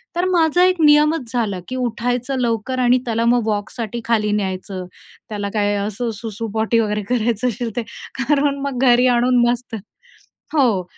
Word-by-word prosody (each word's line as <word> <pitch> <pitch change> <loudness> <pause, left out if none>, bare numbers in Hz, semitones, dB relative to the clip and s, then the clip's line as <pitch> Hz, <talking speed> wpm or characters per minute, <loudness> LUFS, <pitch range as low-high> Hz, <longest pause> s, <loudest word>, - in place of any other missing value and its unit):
तर 350 - +1
माझा 345 -1 +3
एक 365 -2 +2
नियमच 300 -4 +4
झाला, 215 -6 -1
की 255 - -5
उठायचं 245 +2 -2
लवकर 240 +1 -1
आणि 250 0 +4
त्याला 230 -1 0
मग 235 -1 +2
वॉकसाठी 220 +2 -3
खाली 215 -3 +1
न्यायचं. 190 -2 -3 0.4
त्याला 205 -2 -3
काय 205 -1 +1
असं 210 +4 -3
सुसू-पोटी 225 +1 -1
वगैरे 210 -1 0
करायचं 235 -1 0
असेल 240 +1 -4
ते. 240 - 0 0.4
कारण 280 +1 +1
मग 260 -3 -4
घरी 245 +1 +4
आणून 245 0 +3
मस्त, 245 -1 -3 0.8
हो. 235 -11 +2
235 Hz, 155 wpm, -20 LUFS, 215-255 Hz, 0.8 s, नियमच